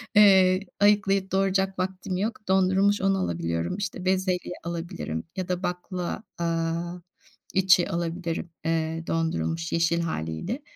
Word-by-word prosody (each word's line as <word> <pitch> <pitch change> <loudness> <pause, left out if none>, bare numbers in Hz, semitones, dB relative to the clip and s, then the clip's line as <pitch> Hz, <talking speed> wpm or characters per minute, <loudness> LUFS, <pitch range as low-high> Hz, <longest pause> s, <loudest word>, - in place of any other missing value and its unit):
eee, 190 -3 +7 0.2
ayıklayıp 200 -2 +3
doğrayacak 190 0 +1
vaktim 185 0 -2
yok. 215 +1 -3
Dondurulmuş 190 +2 +3
onu 195 0 +2
alabiliyorum. 85 - -2
İşte, 190 -2 -4
bezelye 185 -1 0
alabilirim 170 - -4
ya 185 -2 -3
da 180 +1 -1
bakla, 180 +3 -3 0.2
aaa, 170 +1 -1 0.5
içi 185 -2 +4
alabilirim, 170 0 -3 0.2
eee, 165 0 -1
dondurulmuş 165 0 -1
yeşil 170 0 +2
hâliyle. 160 - -3
180 Hz, 115 wpm, -26 LUFS, 165-190 Hz, 0.5 s, eee